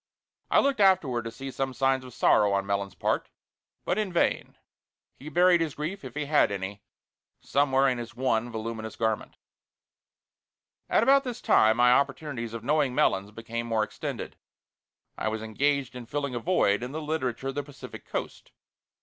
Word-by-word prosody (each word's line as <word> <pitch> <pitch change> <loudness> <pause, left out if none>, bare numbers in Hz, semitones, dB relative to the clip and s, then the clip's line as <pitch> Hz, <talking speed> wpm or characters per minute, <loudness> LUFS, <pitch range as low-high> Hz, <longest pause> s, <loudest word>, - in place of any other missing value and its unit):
I - - +5
looked 275 -4 +1
afterward 165 - +3
to 115 - -4
see 135 +4 -7
some 130 -1 -3
signs 135 -1 +1
of 130 - -10
sorrow 105 -1 +4
on 100 0 0
Melons' 100 -1 -2
part, - - -1 0.6
but 190 - 0
in 210 -3 -1
vain; 175 - 0 0.6
he 145 - -8
buried 175 +2 +4
his 160 -4 -2
grief, 155 +6 -4
if 130 -1 -9
he 150 0 -2
had 145 -7 +3
any, 100 +1 -5 0.6
somewhere 135 -1 +2
in 125 -2 0
his 120 0 -8
one 120 -2 0
voluminous 110 0 -5
garment. 110 -1 -2 1.5
At - - +3
about 275 +3 +5
this 245 -2 -5
time 110 +1 +4
my 125 0 +5
opportunities 130 -3 0
of 115 - -6
knowing 140 -1 +1
Melons 95 -3 +2
became 115 +2 -5
more 110 -2 +1
extended. - - -6 0.8
I - - -1
was 110 0 -2
engaged 135 +4 0
in 120 -2 -8
filling 140 -1 -3
a 120 - -2
void 115 - +2
in 125 +3 -5
the 155 - -3
Literature 135 -5 -2
of - - -4
the 145 - -2
Pacific 140 -1 -11
Coast. - - -6
130 Hz, 175 wpm, -27 LUFS, 115-150 Hz, 1.5 s, I